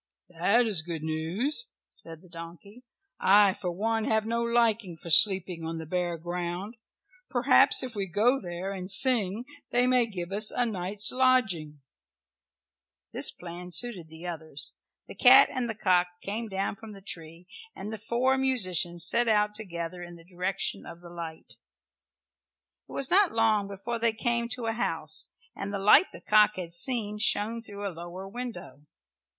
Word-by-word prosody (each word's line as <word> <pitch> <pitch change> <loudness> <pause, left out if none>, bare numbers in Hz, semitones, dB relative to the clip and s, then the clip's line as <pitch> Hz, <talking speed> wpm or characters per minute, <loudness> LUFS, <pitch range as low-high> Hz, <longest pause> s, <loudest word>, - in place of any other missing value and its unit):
"That 195 +8 +2
is 205 -8 +1
good 165 -1 -6
news," 180 - -1 0.2
said 165 +1 -12
the - - -17
donkey. 170 +7 -12 0.4
"I 200 0 +5
for 180 - -5
one 220 +4 -1
have 220 -1 +1
no 230 +1 -1
liking 230 -6 0
for 170 +1 -7
sleeping 180 -1 +6
on 165 0 -4
the 160 - -6
bare 175 +1 -2
ground. 175 +5 -5 0.5
Perhaps 255 +1 +4
if 255 -2 -5
we 200 -2 -3
go 225 +9 +1
there 180 +2 -5
and 185 -1 -6
sing 220 0 +3 0.2
they 245 +1 +2
may 250 -2 +3
give 180 -4 -6
us 210 +2 +2
a 245 - 0
night's 200 -1 -3
lodging." 220 - +1 1.3
This - - +2
plan 180 +1 -9
suited 185 -4 -1
the 160 +2 -11
others. 160 -4 -1 0.3
The - - -9
cat 265 +2 +7
and 250 -2 -3
the 225 - -4
cock 180 -3 +2
came 220 +5 -5
down 195 +1 -3
from 220 0 -11
the 195 - -13
tree, 165 -2 -8 0.3
and 210 +3 -7
the 220 - -6
four 245 +5 0
musicians 185 -10 0
set 235 +6 +1
out 210 -1 +2
together 175 -4 -6
in 175 0 -9
the 165 -1 -16
direction 180 - -3
of 170 - -11
the 175 -1 -13
light. 165 -2 -9 1.3
It - - -13
was 275 - -2
not 390 -1 +4
long 220 -3 +2
before 200 +4 -5
they 230 -1 +2
came 235 +1 -1
to 240 0 -5
a 225 - -1
house 160 -9 -2 0.2
and 200 0 -5
the 200 - -3
light 210 - +5
the - - -11
cock 210 0 +4
had 175 -2 -6
seen 210 +2 0
shone 220 +2 +1
through 205 -2 -7
a 190 - -6
lower 175 +3 -9
window. 195 - -8
200 Hz, 170 wpm, -27 LUFS, 175-230 Hz, 1.3 s, cat